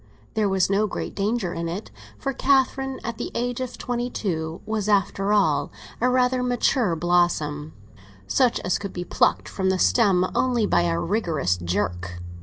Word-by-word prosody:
There 215 Hz, -2 st, +1 dB
was 190 Hz, -1 st, +2 dB
no 200 Hz, +2 st, +2 dB
great -, -, -5 dB
danger 200 Hz, -3 st, -1 dB
in 170 Hz, 0 st, -3 dB
it; 190 Hz, +6 st, -6 dB, 0.3 s
for 275 Hz, -2 st, -3 dB
Catherine, 270 Hz, 0 st, +1 dB
at 230 Hz, 0 st, -5 dB
the -, -, -4 dB
age 245 Hz, +1 st, -2 dB
of 255 Hz, -1 st, -5 dB
twenty 245 Hz, 0 st, -2 dB
two, 160 Hz, -7 st, -3 dB
was, 215 Hz, -1 st, -2 dB
after 195 Hz, 0 st, +1 dB
all, 155 Hz, -9 st, +2 dB, 0.3 s
a 250 Hz, -, +3 dB
rather 255 Hz, 0 st, +2 dB
mature 245 Hz, -5 st, +1 dB
blossom, 155 Hz, -3 st, +1 dB, 0.5 s
such 250 Hz, -, +2 dB
as 180 Hz, -, 0 dB
could 200 Hz, -2 st, -6 dB
be 175 Hz, 0 st, -4 dB
plucked -, -, +1 dB
from 190 Hz, -1 st, -1 dB
the 190 Hz, -, +2 dB
stem 180 Hz, -, +3 dB
only 245 Hz, -4 st, +2 dB
by -, -, +3 dB
a 85 Hz, -1 st, 0 dB
vigorous 165 Hz, -, 0 dB
jerk. 90 Hz, 0 st, -3 dB
195 Hz, 170 wpm, -24 LUFS, 165-240 Hz, 0.5 s, a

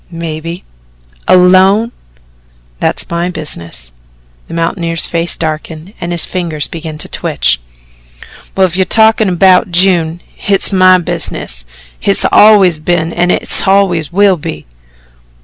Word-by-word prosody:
"Maybe." 165 Hz, 0 st, -6 dB, 0.6 s
"Alone?" 190 Hz, +5 st, +4 dB, 0.9 s
"That's -, -, -2 dB
my 170 Hz, +1 st, -2 dB
business." 85 Hz, -, -2 dB, 0.6 s
The -, -, -8 dB
mountaineer's 165 Hz, 0 st, -2 dB
face 170 Hz, 0 st, -2 dB
darkened 160 Hz, +3 st, -5 dB
and 170 Hz, -, -4 dB
his 170 Hz, -1 st, 0 dB
fingers 165 Hz, -5 st, -3 dB
began 160 Hz, -2 st, -7 dB
to -, -, -6 dB
twitch. -, -, 0 dB, 1.0 s
"Well, 190 Hz, -, +4 dB
if 175 Hz, -2 st, -3 dB
you're 190 Hz, -, +2 dB
talkin' 220 Hz, -1 st, +2 dB
'bout 185 Hz, +1 st, +4 dB
June, 175 Hz, -2 st, +1 dB
hit's 200 Hz, 0 st, -1 dB
MY 185 Hz, -1 st, +5 dB
business. 165 Hz, -, -2 dB, 0.3 s
Hit 200 Hz, -, 0 dB
always 200 Hz, -6 st, +5 dB
has 155 Hz, -, -19 dB
been 170 Hz, -1 st, -1 dB
and 175 Hz, +1 st, 0 dB
hit -, -, 0 dB
always 190 Hz, -5 st, +1 dB
will 195 Hz, 0 st, +3 dB
be." 75 Hz, -, -7 dB
175 Hz, 130 wpm, -11 LUFS, 160-190 Hz, 1.0 s, MY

